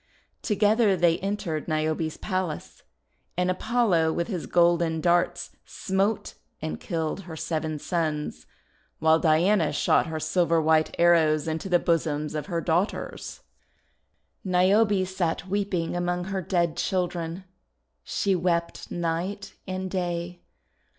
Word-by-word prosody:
Together 210 Hz, -1 st, +3 dB
they 170 Hz, -1 st, +3 dB
entered 195 Hz, -6 st, -3 dB
Niobe's 155 Hz, 0 st, -1 dB
palace. 185 Hz, -5 st, -4 dB, 0.6 s
And 180 Hz, 0 st, +2 dB
Apollo 185 Hz, -5 st, +2 dB
with 170 Hz, +6 st, -2 dB
his 180 Hz, -6 st, -4 dB
golden 170 Hz, -2 st, +3 dB
darts 175 Hz, +1 st, +1 dB
smote 195 Hz, +3 st, -1 dB, 0.3 s
and 80 Hz, 0 st, -4 dB
killed 160 Hz, 0 st, -3 dB
her 160 Hz, -, -6 dB
seven 155 Hz, -1 st, -2 dB
sons; 150 Hz, -, -3 dB, 0.5 s
while 160 Hz, +1 st, +4 dB
Diana 165 Hz, +2 st, +3 dB
shot 150 Hz, -, +2 dB
her 160 Hz, -1 st, -3 dB
silver 165 Hz, +1 st, +2 dB
white 160 Hz, 0 st, +2 dB
arrows 160 Hz, -3 st, +4 dB
into 160 Hz, +4 st, -3 dB
the 180 Hz, -, +5 dB
bosoms 155 Hz, -3 st, 0 dB
of 150 Hz, +3 st, -4 dB
her 170 Hz, -3 st, -2 dB
daughters. 175 Hz, +5 st, -2 dB, 1.0 s
Niobe 190 Hz, +2 st, +3 dB
sat 180 Hz, -1 st, -2 dB
weeping 190 Hz, -4 st, -1 dB
among 175 Hz, 0 st, -1 dB
her 190 Hz, +1 st, -3 dB
dead 170 Hz, -2 st, 0 dB
children. 175 Hz, -1 st, -2 dB, 0.6 s
She 195 Hz, -, 0 dB
wept 170 Hz, -1 st, -1 dB
night 175 Hz, +4 st, -3 dB
and 185 Hz, 0 st, -3 dB
day. 175 Hz, -1 st, -3 dB
175 Hz, 120 wpm, -26 LUFS, 160-185 Hz, 1.0 s, the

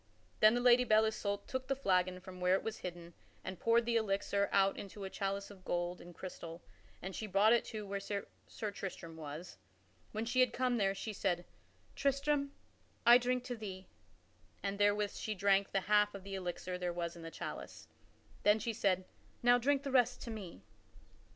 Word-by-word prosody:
Then 215 Hz, +2 st, +7 dB
the 245 Hz, -, +1 dB
Lady 245 Hz, 0 st, +6 dB
Belle 220 Hz, -2 st, +5 dB
Isoult 205 Hz, -2 st, -2 dB
took 260 Hz, 0 st, -3 dB
the 270 Hz, -, +1 dB
flagon 185 Hz, -7 st, +1 dB
from 185 Hz, 0 st, -11 dB
where 180 Hz, +1 st, +4 dB
it -, -, -1 dB
was 225 Hz, -1 st, -4 dB
hidden, 175 Hz, -1 st, -7 dB, 0.3 s
and 185 Hz, -1 st, -6 dB
poured 230 Hz, 0 st, +3 dB
the 235 Hz, 0 st, +2 dB
elixir 200 Hz, -1 st, 0 dB
out 195 Hz, 0 st, +4 dB
into 200 Hz, 0 st, -8 dB
a 190 Hz, -, -5 dB
chalice 195 Hz, +1 st, -3 dB
of 190 Hz, -2 st, -14 dB
gold 175 Hz, 0 st, -2 dB
and 175 Hz, 0 st, -12 dB
crystal 170 Hz, -2 st, -8 dB, 0.4 s
and 190 Hz, +1 st, -5 dB
she 220 Hz, -, -4 dB
brought 205 Hz, +3 st, +5 dB
it 235 Hz, -, +3 dB
to 215 Hz, -2 st, -5 dB
where 200 Hz, 0 st, -3 dB
Sir 200 Hz, 0 st, -3 dB, 0.5 s
Tristram 175 Hz, -4 st, -6 dB
was. 160 Hz, +3 st, -8 dB, 0.5 s
When 220 Hz, +1 st, -2 dB
she 245 Hz, +2 st, 0 dB
had 250 Hz, -2 st, +5 dB
come 250 Hz, -1 st, +1 dB
there, 195 Hz, -2 st, +2 dB
she 215 Hz, +2 st, -4 dB
said, 180 Hz, -3 st, -1 dB, 0.5 s
"Tristram, 280 Hz, +1 st, +1 dB, 0.5 s
I 240 Hz, +1 st, +9 dB
drink 250 Hz, 0 st, 0 dB
to 250 Hz, -1 st, -4 dB
thee," 195 Hz, -4 st, -7 dB, 0.7 s
and 200 Hz, 0 st, -2 dB
therewith 205 Hz, 0 st, +3 dB
she 215 Hz, -, -3 dB
drank 195 Hz, 0 st, +3 dB
the 195 Hz, -, +1 dB
half 210 Hz, +1 st, +3 dB
of 195 Hz, -, -8 dB
the 195 Hz, 0 st, -7 dB
elixir 180 Hz, -1 st, -4 dB
there 180 Hz, -1 st, -1 dB
Was 170 Hz, 0 st, -3 dB
in 170 Hz, -, -10 dB
the 165 Hz, -, -6 dB
chalice. -, -, -7 dB, 0.5 s
Then 210 Hz, +1 st, +5 dB
she 230 Hz, +1 st, -2 dB
said, 185 Hz, -3 st, +1 dB, 0.4 s
"Now 245 Hz, 0 st, +6 dB
drink 280 Hz, +2 st, +2 dB
thou 275 Hz, -, -3 dB
the -, -, -7 dB
rest 250 Hz, -2 st, +4 dB
to 235 Hz, -, -5 dB
me." 190 Hz, -, -8 dB
200 Hz, 195 wpm, -35 LUFS, 185-230 Hz, 0.7 s, I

